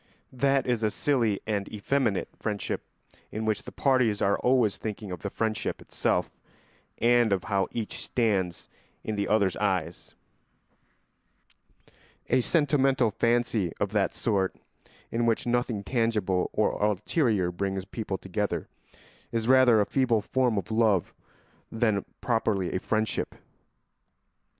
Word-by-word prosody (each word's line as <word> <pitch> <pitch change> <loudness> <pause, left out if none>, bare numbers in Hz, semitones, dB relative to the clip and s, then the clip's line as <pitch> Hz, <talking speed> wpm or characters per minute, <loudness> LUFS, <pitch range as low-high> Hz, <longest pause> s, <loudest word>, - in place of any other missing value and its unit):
That 135 +1 +2
is 120 -3 0
a 110 - +2
silly 115 -5 +1
and 105 -2 -2
effeminate 110 -1 0
friendship 105 -2 -3 0.5
in 110 +1 -3
which 110 -2 0
the - - -10
parties 125 -6 +2
are 100 +1 +2
always 125 -6 +2
thinking 105 -2 -5
of 90 - -5
the 100 - -4
friendship 110 +1 -2
itself - - -1 0.7
and 120 -1 +4
of 95 -2 +1
how 100 -2 0
each 115 -3 -4
stands 100 -8 -1 0.4
in 110 - -3
the 100 -1 -1
other's 100 -3 +2
eyes; 90 -5 -2 2.2
a 130 - +4
sentimental 135 -5 +2
fancy 115 -5 +1
of 100 - -1
that 105 -2 +1
sort, 100 -4 0 0.6
in 115 0 0
which 115 - +1
nothing 120 -3 0
tangible 105 -5 0
or - - 0
ulterior 105 - +1
brings 95 +1 -3
people 100 -1 -4
together, 95 -3 -3 0.6
is 115 -1 -1
rather 130 -3 +6
a - - +2
feeble 125 -4 +1
form 125 -2 +1
of 100 +2 -3
love 110 -5 +2 0.6
than 110 -3 +1 0.2
properly 110 -6 0
a 95 - 0
friendship. 110 +2 -1
110 Hz, 130 wpm, -27 LUFS, 100-120 Hz, 2.2 s, rather